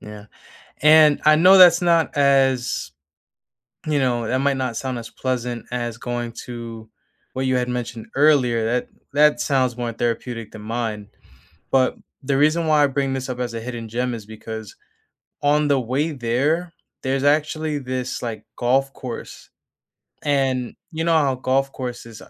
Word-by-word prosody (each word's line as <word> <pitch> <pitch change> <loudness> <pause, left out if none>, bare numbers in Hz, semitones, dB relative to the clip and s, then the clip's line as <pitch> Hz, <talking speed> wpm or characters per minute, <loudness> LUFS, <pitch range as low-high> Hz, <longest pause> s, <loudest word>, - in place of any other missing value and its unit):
Yeah. 105 0 -11 0.6
And 155 -1 +6
I 155 0 +6
know 185 +4 +7
that's 175 -1 +8
not 170 -2 +2
as 135 - +2 1.0
you 150 -1 +1
know, 120 -3 0
that 130 +3 0
might 140 0 +1
not 130 -3 -2
sound 130 -2 -3
as 115 0 -9
pleasant 125 -1 -3
as 120 -2 -3
going 120 -1 -4
to 115 -2 -8 0.4
what 130 +1 -2
you 130 0 +1
had 125 0 0
mentioned 120 -2 -5
earlier, 130 -6 +3
that 120 +2 -1 0.3
that 150 +1 +4
sounds 130 -4 +1
more 120 -1 -3
therapeutic 115 -1 -3
than 110 - -10
mine. 110 -2 -4 0.6
But 130 -1 +3 0.3
the 135 0 0
reason 155 +3 +2
why 150 -1 +4
I - - +5
bring 135 0 -1
this 130 0 -4
up 125 -1 -4
as 120 -2 -3
a 115 - -5
hidden 120 -1 -6
gem 125 +2 -2
is 110 -3 -7
because 110 0 -8 0.7
on 150 +1 +3
the 140 -2 +3
way 130 +7 -1
there, 145 +7 -1 0.3
there's 135 +1 -1
actually 155 +1 +1
this, 130 -1 -4
like, 110 -3 -5
golf 135 +3 +1
course, 125 -3 -8 0.8
and, 135 -4 0 0.2
you 160 0 -3
know 165 -1 +4
how 140 -4 +2
golf 135 +2 0
courses, 120 -4 -7
uh, - - -14
130 Hz, 165 wpm, -22 LUFS, 120-145 Hz, 1.0 s, that's